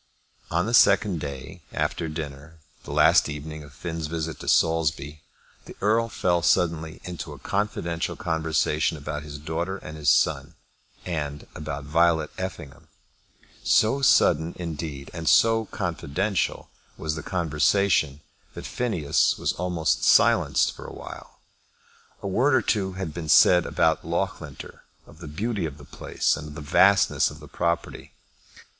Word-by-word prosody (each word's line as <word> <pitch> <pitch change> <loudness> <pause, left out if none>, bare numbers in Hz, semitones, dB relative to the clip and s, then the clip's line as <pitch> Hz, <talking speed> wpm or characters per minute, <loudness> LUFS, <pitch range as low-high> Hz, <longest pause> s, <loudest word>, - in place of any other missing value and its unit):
On 85 +2 0
the 115 - -3
second 100 -6 +4
day 70 +5 -7
after 80 - -2
dinner, 75 0 -7 0.3
the - - -7
last - - +4
evening 75 +1 -7
of 70 - -13
Finn's 80 +2 -5
visit 80 0 -4
to - - -9
Saulsby, 80 -2 +1 0.4
the - - -11
Earl 115 +3 +2
fell 90 -4 0
suddenly 80 +1 +1
into 90 -4 -7
a - - -11
confidential 85 -5 -2
conversation 80 -1 0
about 75 +1 -5
his 75 -1 -8
daughter 80 +5 -3
and 75 -4 -9
his 75 -1 +1
son, 70 +4 +2 0.5
and 75 -4 -4
about 75 -2 -6
Violet 80 +1 +2
Effingham. 85 -7 -7 0.8
So 125 +6 +3
sudden, 80 - +3
indeed, 80 -5 -6
and 80 -3 -1
so 115 +5 +4
confidential 95 0 -2 0.3
was 80 -1 -3
the 80 - -5
conversation, 80 -2 +1 0.3
that - - -7
Phineas 105 -13 0
was - - -1
almost 85 -3 -1
silenced - - +4
for - - -12
awhile. - - -11 0.8
A - - -2
word 130 +8 +2
or - - +2
two 95 -3 0
had 95 -4 -5
been 80 -2 -6
said 90 +2 +6
about 80 -1 +1
Loughlinter, 85 -4 -4 0.2
of - - -17
the - - -9
beauty 100 +4 -2
of 75 -2 -9
the 70 - -13
place - - -1
and 75 +1 -8
of 75 - -10
the 80 - -7
vastness 95 +6 +4
of 75 +2 -12
the 75 - -12
property. 85 +2 -3
80 Hz, 145 wpm, -25 LUFS, 75-90 Hz, 0.8 s, said